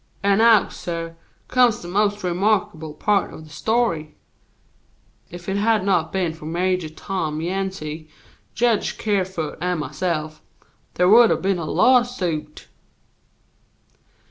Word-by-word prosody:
"And 200 +1 +3
now, 225 -2 +6
suh, 165 -1 -5 0.4
comes 245 -6 +3
the - - -7
most 205 +2 0
remarkable 180 -4 0
part 205 +5 +1
of 160 - -10
the 155 - -15
story. 170 -4 -1 1.1
If 175 0 -10
it 195 +1 -1
had 215 -1 +2
not 185 -5 +1
been 180 -4 -1
for 160 -1 -12
Major 180 0 -1
Tom 155 -2 -4
Yancey, 165 -3 -4 0.5
Jedge 230 -3 +1
Kerfoot 190 -6 -2
and 180 -1 -1
myself, 155 -1 -3 0.5
there 180 - +3
would 230 +3 +7
have - - 0
been 195 -2 +1
a 165 - -4
lawsuit." 195 -10 +1
185 Hz, 125 wpm, -22 LUFS, 160-205 Hz, 1.1 s, would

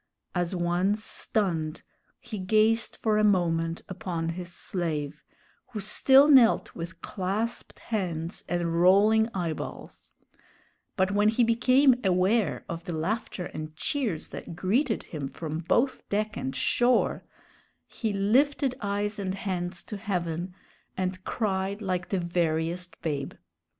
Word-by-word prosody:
As 175 0 -1
one 175 +3 +1
stunned, 180 -7 -1 0.4
he 225 -4 -7
gazed 215 +4 +2
for 215 -1 +3
a - - +3
moment 165 -4 +1
upon 175 -3 -3
his 175 +1 -5
slave, 155 -5 -3 0.5
who 215 - -3
still 265 +7 +6
knelt 260 -6 +5
with 170 +1 -8
clasped 210 +5 -3
hands 175 -7 -3
and 170 -1 0
rolling 210 +5 +5
eyeballs; 170 -4 -5 0.9
but 190 +1 +2
when 205 +1 +3
he 225 +2 +2
became 255 +3 +4
aware 185 - +2
of 170 0 -6
the 170 -3 -3
laughter 185 +1 -2
and 155 0 -7
cheers 220 - -2
that 170 - -8
greeted 220 - 0
him 145 -4 -5
from 155 +2 -5
both 240 +10 0
deck 210 +1 -1
and 130 - -4
shore, 245 0 +2 0.6
he 220 -3 -3
lifted 255 +7 +2
eyes 205 0 -2
and 190 -1 -2
hands 180 -2 -3
to 210 - -6
heaven, 180 -3 -3 0.4
and 185 0 -2
cried 195 -2 -1
like 180 -4 -2
the 195 - 0
veriest 170 0 -1
babe. 145 -4 -2
185 Hz, 130 wpm, -27 LUFS, 170-215 Hz, 0.9 s, still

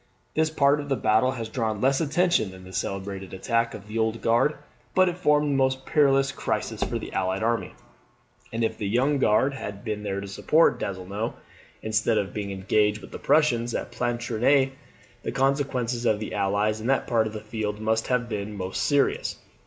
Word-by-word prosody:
This 160 0 +2
part 145 -1 +3
of 145 -1 -6
the 135 - +2
battle 120 +3 +2
has 115 -3 -4
drawn 110 -2 -2
less 135 +5 +2
attention 165 - +2
than 95 0 -12
the 95 0 -12
celebrated 95 0 -4
attack 115 +4 0
of 100 - -11
the 110 +2 -3
Old 110 +1 0
Guard; 120 +6 +3 0.4
but 185 0 +5
it 175 - -1
formed 150 -4 +2
the - - +1
most 130 0 +1
perilous 135 -2 +3
crisis - - -3
for - - -2
the - - -7
allied 95 +2 -1
army; 115 +1 -1 0.8
and 115 +1 -1
if 110 - -1
the 105 - -2
Young 130 +7 +2
Guard 130 +4 +3
had 105 -6 -7
been 105 -3 -3
there 100 -1 -3
to 100 - -6
support 155 +11 +3
Donzelot, 100 +4 -4 0.5
instead 110 +1 +1
of 95 - -1
being 105 -2 -4
engaged 105 +2 +1
with - - -12
the - - -7
Prussians 120 -7 +2
at - - -4
Planchenoit, 120 +3 +1 0.5
the - - -3
consequences 130 -2 0
to 115 -3 +3
the 110 - -6
Allies 105 +2 0
in 115 - -4
that 135 - +2
part 110 -2 +2
of 110 - -7
the 110 - -4
field 105 -1 -4
must 110 +1 0
have 125 -2 +1
been 105 -2 -4
most 95 0 -3
serious. 145 -2 +1
115 Hz, 195 wpm, -26 LUFS, 105-135 Hz, 0.8 s, but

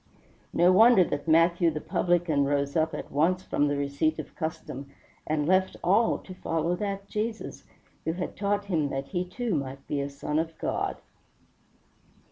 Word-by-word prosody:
No 175 +2 +4
wonder 220 +1 +7
that 145 -2 -4
Matthew 165 +1 +4
the 155 -1 -3
publican 165 -1 +1
rose 140 0 0
up 160 -1 +1
at - - -7
once 175 +6 +2
from 145 - +1
the 145 0 0
receipt 140 +3 0
of - - -8
custom 160 -4 -5 0.4
and 150 -1 0
left 185 +3 +2
all 205 +6 +3
to 185 - -11
follow 165 -1 -1
that 200 0 -4
Jesus, 220 +2 -4 0.4
who 160 - -1
had 180 +1 -4
taught 205 0 0
him 160 -7 0
that 135 0 -4
he 180 -1 -1
too 225 +4 -3
might 135 -2 -3
be 145 - -2
a 140 - -3
son 140 +2 -2
of 165 0 -3
God. - - -2
165 Hz, 170 wpm, -27 LUFS, 145-185 Hz, 0.4 s, wonder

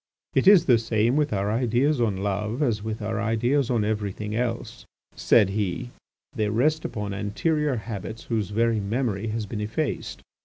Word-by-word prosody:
"It - - +2
is 195 -4 +8
the 120 -4 +5
same 115 +2 +1
with 150 -1 +1
our 100 0 0
ideas 125 +4 +1
on 105 -5 +1
love 105 +7 -1
as 115 -6 0
with 110 0 -4
our 110 +1 -2
ideas 120 +5 +1
on 115 -4 +1
everything 105 0 -3
else," 115 0 -3 0.3
said 100 - +4
he, 105 +4 -2 0.4
"they 105 -1 0
rest 150 +9 +1
upon 105 -2 -4
anterior 140 - 0
habits 110 0 -6
whose 110 -5 -2
very 115 +1 +1
memory 110 0 -1
has 110 0 -2
been 105 +1 -5
effaced. 115 +8 -3
110 Hz, 165 wpm, -25 LUFS, 105-125 Hz, 0.4 s, is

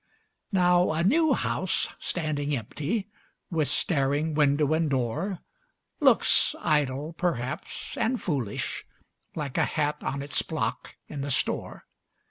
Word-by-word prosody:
Now, 180 -3 +4
a 160 +1 0
new 315 - +4
house - - 0
standing 150 -4 -1
empty, 155 - -3 0.4
with 155 -4 +1
staring 145 +1 +1
window 150 0 +3
and 160 -1 +1
door, 145 - -1 0.6
Looks - - +5
idle, 150 0 0
perhaps, 155 -5 -3
and 250 +1 +1
foolish, 130 - -2 0.5
like 145 -4 -3
a - - +4
hat 150 -1 -1
on 140 +1 -3
its 140 - +2
block - - -3
in 145 - -6
the 140 - -3
store. 135 - -1
150 Hz, 120 wpm, -27 LUFS, 140-175 Hz, 0.6 s, Looks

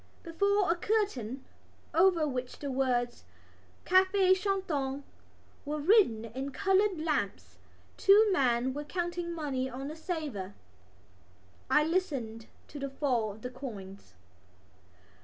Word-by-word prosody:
Before 400 +3 +1
a - - +2
curtain, 340 - -1 0.5
over 340 -2 +4
which 255 -2 -4
the 285 -2 -4
words 245 -2 0 0.6
Café 375 0 +5
Chantant 335 -9 -2 0.6
were 300 +1 -3
written 295 - +4
in 260 +5 -5
coloured 385 +4 +2
lamps, 315 0 -2 0.4
two 415 +2 +6
men 255 -4 +2
were 295 +2 -4
counting 345 +2 -3
money 280 -6 -2
on 270 +3 -6
a - - -8
salver. 295 - -5 1.1
I 300 - +5
listened 275 -10 -2 0.2
to 290 - -8
the 275 0 -3
fall 255 -6 0
of 215 - -16
the 250 - -5
coins. 200 - -9
290 Hz, 120 wpm, -30 LUFS, 255-370 Hz, 1.1 s, two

